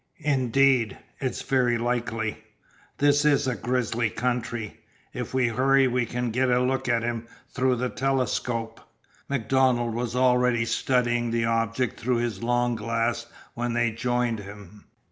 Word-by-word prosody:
"Indeed, 130 -4 +2 0.2
it's 130 -3 -3
very 125 -3 +2
likely. 115 -2 -2 0.6
This 145 0 +3
is 145 -3 +3
a 130 - 0
grizzly 120 -2 -1
country. 120 -2 -3 0.3
If - - -5
we 125 -2 +3
hurry 135 +3 +3
you 125 -1 +1
can 125 0 -2
get 125 +3 +1
a 125 0 +3
look 130 +1 0
at 115 -1 +2
him 115 -1 -3 0.2
through 130 -1 +1
the 125 +1 -2
telescope." 120 -4 -1 0.5
MacDonald 130 -2 +1
was 120 +1 -3
already 125 -2 +3
studying 120 0 +1
the 115 0 0
object 115 +1 -1
through 120 +1 0
his 115 -4 -2
long 120 0 +1
glass 115 +1 -1 0.3
when 120 0 -2
they 120 -1 +1
joined 120 0 -1
him. 105 0 -12
120 Hz, 145 wpm, -26 LUFS, 115-125 Hz, 0.6 s, This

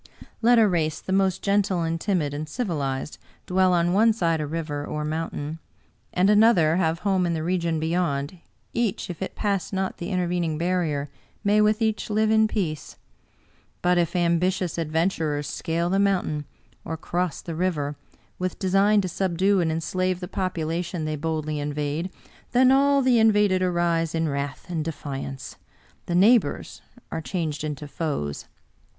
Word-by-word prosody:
Let 240 +1 +5
a 225 -2 +6
race 160 -4 0
the 190 - -4
most 190 -2 +1
gentle 200 -3 +1
and 165 0 -2
timid 170 -8 0
and 150 +1 -5
civilized 150 - -3 0.3
dwell 185 0 +3
on 175 0 +2
one 220 +3 +5
side 165 -7 0
a 150 - -3
river 155 -2 -3
or 150 +1 -4
mountain, 155 0 -4 0.5
and 180 +2 +2
another 205 -7 +5
have 165 -2 0
home 190 -3 +2
in 170 - 0
the 155 - -3
region 170 -2 0
beyond, 160 -1 -1 0.3
each, 225 -6 -1
if 170 - -10
it 190 - -4
pass 200 -3 -1
not 190 -1 -2
the 170 - -4
in 185 - -1
tervening 175 -3 0
barrier, 160 -5 -1 0.3
may 210 +1 +4
with 215 +1 +3
each 220 -1 -1
live 215 +1 +2
in 220 0 +5
peace. 175 -9 -3 0.9
But 180 0 +3
if 170 +1 0
ambitious 175 0 +1
adventurers 160 -2 0
scale 170 +3 -2
the 195 - +2
mountain, 180 -7 +1 0.4
or 160 - -4
cross 175 0 -2
the 170 - -5
river, 155 -4 -1 0.4
with 185 0 -2
design 200 +2 +3
to 185 - -2
subdue 190 +2 +1
and 165 -2 +1
enslave 185 +3 -1
the 180 - -5
population 170 -2 -2
they 155 0 -2
boldly 155 0 -2
invade, 150 +4 -2 0.4
then 255 +1 +5
all 280 +1 +4
the 250 -2 +4
invaded 210 -4 +4
arise 170 -2 +1
in 165 0 +1
wrath 140 -1 -3
and 170 -3 -2
de 165 - -2
fiance 135 -2 -7 0.2
— - - -33
the 175 - -1
neighbors 205 -2 +3 0.3
are 160 - -3
changed 155 -4 -3
into 150 -1 -4
foes. 140 - -3
175 Hz, 165 wpm, -25 LUFS, 155-190 Hz, 0.9 s, a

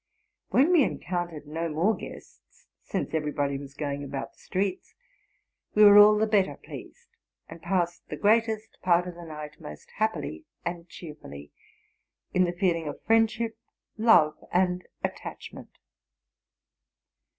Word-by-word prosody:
When 285 +7 +4
we 345 -4 +6
encountered 175 -8 -3
no 165 +3 -3
more 165 +8 +2
guests, - - -12 0.2
since - - -4
everybody 145 -3 -1
was 140 -1 -11
going 145 -1 -3
about 135 -1 -5
the - - -28
streets, 190 0 -3 0.8
we 210 - +7
were 205 0 +10
all 210 +1 +8
the 215 - +3
better 205 -3 +2
pleased, 480 -1 -12 0.4
and 165 0 -11
passed 175 -3 -1
the - - -4
greatest 220 +1 +1
part 180 0 +3
of 180 - -6
the 170 0 -11
night 150 -2 -9
most 75 0 -10
happily 220 +9 -2 0.2
and 170 0 -5
cheerfully, 150 - -10 0.8
in 185 0 +4
the 175 - -1
feeling 175 -3 0
of 145 - -5
friendship, 225 0 +2 0.4
love, 215 -9 +4
and 180 0 +1 0.2
attachment. - - -7
180 Hz, 135 wpm, -27 LUFS, 155-215 Hz, 0.8 s, were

